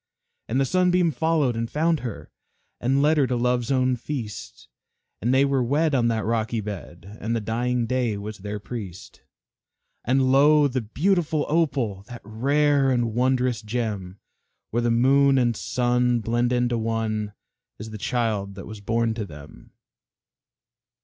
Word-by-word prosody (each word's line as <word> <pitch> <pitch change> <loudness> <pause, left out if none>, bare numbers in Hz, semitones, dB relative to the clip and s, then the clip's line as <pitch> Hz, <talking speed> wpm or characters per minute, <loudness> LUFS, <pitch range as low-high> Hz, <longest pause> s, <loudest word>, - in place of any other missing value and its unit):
And 125 +4 +1
the 135 - +3
Sunbeam 180 +2 +2
followed 150 -2 +1
and 115 0 -3
found 160 +1 +1
her, 120 -5 -7 0.5
And 135 +3 +1
led 155 +1 +3
her 140 -3 +3
to 125 - -1
Love's 125 0 0
own 130 -1 +2
feast; 115 - -7 0.5
And 120 +5 +1
they 135 +1 +4
were 135 -1 +1
wed 145 +5 +1
on 120 -3 +2
that 115 -1 -1
rocky 115 0 -1
bed, 100 -2 -8
And 115 +3 -1
the - - 0
dying 120 +3 -1
Day 120 -3 -1
was 105 +1 -7
their 105 +2 -5
priest. 100 -4 -8 0.8
And 130 +1 +2
lo! 145 +2 +5
the 130 -1 -2
beautiful 155 - 0
Opal 135 - 0
That 120 -2 -10
rare 140 +5 +2
and 120 -3 0
wondrous 125 -1 +1
gem 105 -4 -4 0.5
Where 120 - 0
the 120 - +1
moon 135 +4 +4
and 120 -2 +2
sun 125 +1 +1
blend 120 +2 0
into 120 -1 +1
one, 110 -2 -2 0.4
Is 110 +1 -8
the 110 - -7
child 105 -5 -1
that 95 - -8
was 105 -1 -9
born 115 +2 0
to 110 -2 -4
them. 75 -2 -13
120 Hz, 155 wpm, -24 LUFS, 110-135 Hz, 0.8 s, lo